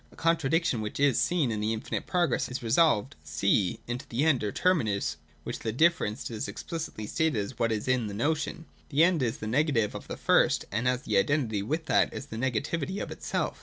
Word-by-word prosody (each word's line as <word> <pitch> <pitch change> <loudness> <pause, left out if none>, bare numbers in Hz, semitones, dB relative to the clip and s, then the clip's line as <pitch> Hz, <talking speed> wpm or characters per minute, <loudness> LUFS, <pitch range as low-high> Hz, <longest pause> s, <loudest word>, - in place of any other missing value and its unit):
That - - -19
contradiction 165 -5 +1
which 105 +4 -5
is 135 -4 +3
seen 150 -1 +1
in 110 - -2
the 110 +1 0
infinite 110 - -4
progress 175 -2 +1
is 125 0 -5
resolved 135 0 +3
(c) 100 +2 +1
into 120 +2 -5
the 120 +5 0
end 145 -8 +3
or 105 - -1
terminus, 115 - +1 0.3
where - - -4
the 110 - -3
differenced 135 -5 +1
is 110 -2 -3
explicitly 110 +1 -5
stated 160 +5 0
as 105 +4 -4
what 115 -1 +2
it - - +2
is 105 - -5
in 130 -3 +1
notion. 150 +9 -2 0.2
The 150 +2 +4
end 175 -3 +3
is 115 -3 0
the - - -6
negative 120 -2 +1
of - - -8
the - - -6
first, - - +3
and 110 +5 0
as 125 +1 +1
the 105 -7 +1
identity 115 -4 +1
with 155 +10 -2
that, - - +3
is - - -5
the 115 - -8
negativity 140 - -1
of - - -5
itself. - - -3
125 Hz, 210 wpm, -28 LUFS, 110-155 Hz, 0.3 s, The